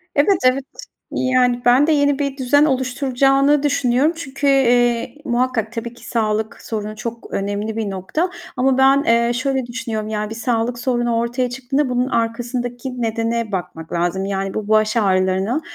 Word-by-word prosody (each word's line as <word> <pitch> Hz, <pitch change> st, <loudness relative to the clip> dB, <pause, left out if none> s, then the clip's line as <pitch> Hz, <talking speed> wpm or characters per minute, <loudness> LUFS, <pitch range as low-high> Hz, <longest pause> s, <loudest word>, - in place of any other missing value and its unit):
Evet, 350 Hz, +7 st, +4 dB
evet. 255 Hz, +2 st, +3 dB, 0.5 s
Yani, 250 Hz, -1 st, +1 dB
ben 250 Hz, +5 st, +5 dB
de -, -, +3 dB
yeni 285 Hz, -2 st, +2 dB
bir 280 Hz, -1 st, -2 dB
düzen 285 Hz, +3 st, +3 dB
oluşturacağını 270 Hz, +1 st, +2 dB
düşünüyorum. 280 Hz, +1 st, +2 dB
Çünkü, 285 Hz, -3 st, -4 dB
eee, 245 Hz, -3 st, +3 dB
muhakkak, 240 Hz, -3 st, 0 dB
tabii 235 Hz, 0 st, -5 dB
ki 240 Hz, -1 st, -15 dB
sağlık 220 Hz, -1 st, -1 dB
sorunu 215 Hz, -1 st, -5 dB
çok 230 Hz, +1 st, -7 dB
önemli 205 Hz, +2 st, -2 dB
bir 220 Hz, -2 st, -2 dB
nokta 195 Hz, -, -2 dB, 0.3 s
ama, 260 Hz, +2 st, +3 dB
eee, 260 Hz, -, +1 dB
ben 265 Hz, -3 st, +4 dB
şöyle 260 Hz, +1 st, -1 dB
düşünüyorum; 230 Hz, -3 st, -4 dB
ya, 210 Hz, -1 st, -2 dB
bir 225 Hz, -, -6 dB
sağlık 235 Hz, 0 st, -1 dB
sorunu 240 Hz, -2 st, 0 dB
ortaya 240 Hz, +2 st, -1 dB
çıktığında 265 Hz, +3 st, -1 dB
bunun 250 Hz, 0 st, 0 dB
arkasındaki 245 Hz, +2 st, -3 dB
nedene 230 Hz, 0 st, -1 dB
bakmak 170 Hz, -4 st, -5 dB
lazım. 175 Hz, +3 st, -1 dB
Yani, 195 Hz, 0 st, -2 dB
bu 215 Hz, -1 st, -4 dB
baş 215 Hz, +1 st, +2 dB
ağrılarına 190 Hz, +5 st, +1 dB
240 Hz, 155 wpm, -19 LUFS, 220-265 Hz, 0.5 s, ben